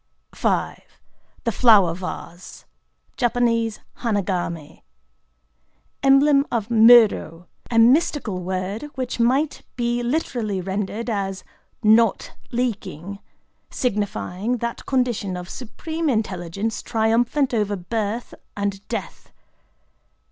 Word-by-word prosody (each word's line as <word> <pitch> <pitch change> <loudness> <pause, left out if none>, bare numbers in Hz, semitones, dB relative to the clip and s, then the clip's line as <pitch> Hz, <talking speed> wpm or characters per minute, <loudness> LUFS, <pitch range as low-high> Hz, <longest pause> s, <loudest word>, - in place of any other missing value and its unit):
V.—The 230 - -4
Flower 205 -7 +5
Vase 180 0 -8 0.5
(Jap. 230 -2 +1 0.2
"Hanagamé"). 180 -8 -2 1.2
Emblem 275 +1 +5
of 230 -2 -1
murō,—a 225 -4 +4
mystical 240 - +3
word 190 +8 -4
which 255 -2 -4
might 265 +6 +1
be 240 -1 0
literally 240 -6 -1
rendered 200 +5 -3
as 195 -4 -2 0.4
"not 220 0 +4 0.2
leaking,"—signifying 205 - -4
that 235 0 -5
condition 240 -8 0
of 180 0 -7
supreme 315 - -4
intelligence 200 -2 -2
triumphant 235 +4 +1
over 210 -3 0
birth 215 +4 -3 0.2
and 200 0 -3
death. 210 -8 -6
220 Hz, 85 wpm, -22 LUFS, 195-245 Hz, 1.2 s, Flower